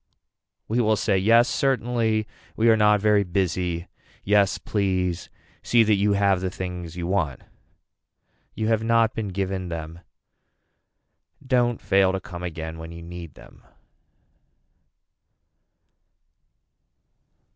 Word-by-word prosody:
We 120 +3 +1
will 110 -1 +3
say 100 -1 0
yes 115 +6 +4
certainly, 120 -5 0 0.3
we 115 +1 +4
are - - +5
not 105 -1 +4
very 105 -1 +3
busy. 90 -2 -2 0.4
Yes 100 -1 +3
please 95 -4 -2 0.3
see 120 -1 +4
that 110 -1 +3
you 100 +1 +2
have 100 -2 +2
the 95 - -1
things 90 -2 -6
you 90 -1 -4
want. 85 -8 -1 1.1
You 110 - -2
have 110 -1 +1
not 115 -1 +3
been 110 -2 -3
given 95 -1 -3
them. 80 0 -6 1.5
Don't 120 -2 +1
fail 95 -1 +2
to 95 - -1
come 90 -1 -9
again 80 -2 -6
when 80 0 -8
you 85 0 -10
need 85 -2 -9
them. - - -16
95 Hz, 120 wpm, -24 LUFS, 90-110 Hz, 1.5 s, are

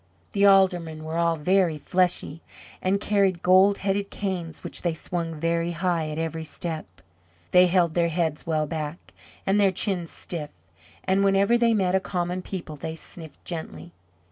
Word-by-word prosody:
The 200 0 +4
Aldermen 175 -5 +3
were 160 +1 -3
all 170 -1 +2
very 175 +1 +2
fleshy, 175 0 0 0.4
and 190 +2 +1
carried 195 -4 +1
gold 190 +2 +5
headed 200 0 0
canes 180 -6 -4
which - - -6
they 170 -2 -1
swung 165 0 -4
very 170 +1 0
high 170 -2 -1
at 150 - -5
every 160 0 -3
step. 160 0 -4 0.6
They 180 0 +7
held 175 -2 +2
their 170 0 +2
heads 160 -2 -2
well 155 -2 +1
back, 155 +1 -6 0.3
and 195 +2 +2
their 200 -2 +4
chins 180 -2 -1
stiff, 155 -4 -5 0.5
and 190 +1 +2
whenever 200 +3 +4
they 235 -1 +3
met 190 -2 +2
common 180 -1 -2
people 170 -5 -6
they 160 +3 -5
sniffed 160 -1 -10
gently. 170 0 -6
175 Hz, 160 wpm, -25 LUFS, 160-190 Hz, 0.6 s, They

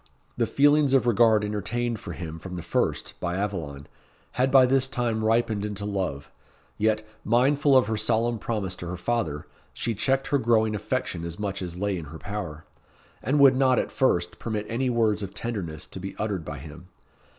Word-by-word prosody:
The - - +1
feelings 145 -1 +4
of 130 - +3
regard 115 -2 +4
entertained 110 +3 -2
for - - -7
him 80 -2 -6
from 90 +2 -7
the 85 - -5
first 85 - -1
by 85 0 -2
Aveline, 80 -9 -3 0.5
had 130 +1 +1
by 130 -1 +7
this 130 +1 +3
time 120 -4 -1
ripened 110 -2 +1
into 105 -1 -3
love; 95 -9 -3 0.5
yet, 110 0 +1 0.2
mindful 135 +4 +4
of 130 - +4
her 110 0 -1
solemn 115 +2 +1
promise 100 -6 -2
to 85 - -7
her 90 +1 -4
father, 90 -8 -2 0.3
she 115 - -1
checked 135 +5 0
her 140 0 +3
growing 110 -2 +2
affection 105 -5 -2
as 85 0 -5
much 100 -2 -3
as 90 -1 -5
lay 100 -1 -1
in 80 - -7
her 80 +2 -9
power, 80 -6 -6 0.6
and 140 +3 +1
would 135 -2 +7
not, 130 -1 +3
at - - 0
first, 90 -9 +1
permit 105 -2 -3
any 125 +3 -1
words 110 -3 +2
of 100 0 -6
tenderness 95 -10 -4
to - - -9
be 95 +1 -6
uttered 100 -6 -2
by 75 - -6
him. 80 +5 -11
105 Hz, 190 wpm, -26 LUFS, 90-120 Hz, 0.6 s, by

